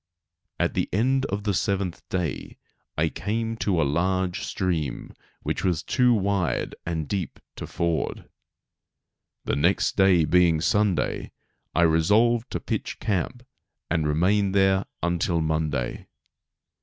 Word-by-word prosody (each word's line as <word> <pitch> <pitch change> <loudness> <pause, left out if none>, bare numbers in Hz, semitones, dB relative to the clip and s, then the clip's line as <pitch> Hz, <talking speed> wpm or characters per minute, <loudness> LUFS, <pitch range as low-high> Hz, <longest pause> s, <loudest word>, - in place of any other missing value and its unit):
At - - +1
the - - -1
end 130 +6 +1
of 100 +1 -3
the 105 -1 0
seventh 95 -1 -1
day 85 -7 -3 0.4
I 80 +1 +2
came 115 +4 -2
to 95 -6 0
a - - +4
large 90 +5 0
stream 80 -8 -2 0.3
which - - -2
was 90 -4 0
too 125 -1 +3
wide 100 - 0
and 80 -3 -2
deep 95 -4 -3 0.2
to - - -6
ford. 85 -2 -2 1.2
The - - 0
next 85 +7 +2
day 95 -4 +5
being 85 0 +4
Sunday 100 +1 0 0.4
I 85 - +4
resolved 105 +9 +3
to - - -3
pitch - - -4
camp 105 +6 -2 0.5
and 80 -3 +1
remain 95 +6 +2
there 95 -1 +3 0.2
until 85 0 +1
Monday. 80 -5 -2
90 Hz, 130 wpm, -25 LUFS, 80-100 Hz, 1.2 s, day